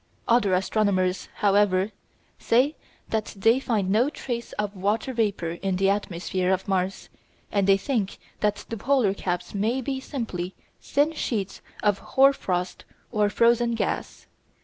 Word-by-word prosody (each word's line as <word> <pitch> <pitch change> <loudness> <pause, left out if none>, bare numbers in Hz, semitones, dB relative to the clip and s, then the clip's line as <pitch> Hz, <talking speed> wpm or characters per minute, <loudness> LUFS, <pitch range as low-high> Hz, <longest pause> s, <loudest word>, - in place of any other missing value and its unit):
Other 230 -6 +4
astronomers, 185 -1 +1
however, 200 -1 +3 0.5
say 260 +6 +3 0.3
that 220 -1 -2
they 225 +6 +4
find 215 -8 0
no 235 +7 +3
trace 240 -5 -5
of 210 -1 -3
water 210 +7 -1
vapour 205 -8 0
in 195 -1 0
the 195 +1 +3
atmosphere 185 -1 -1
of 190 0 0
Mars, 190 0 -1 0.4
and 200 -1 +1
they 195 0 +6
think 210 -3 -2 0.2
that 210 -1 0
the 230 - -4
polar 240 -3 +2
caps 180 -2 -3
may 220 +6 0
be 265 +1 -3
simply 205 -10 -4 0.3
thin 290 +3 +1
sheets 205 -10 -3 0.2
of 205 -2 +2
hoar 275 +1 +4
frost 180 -7 -3 0.3
or 210 -3 +2
frozen 235 +2 +3
gas. - - -3
205 Hz, 145 wpm, -25 LUFS, 190-235 Hz, 0.5 s, they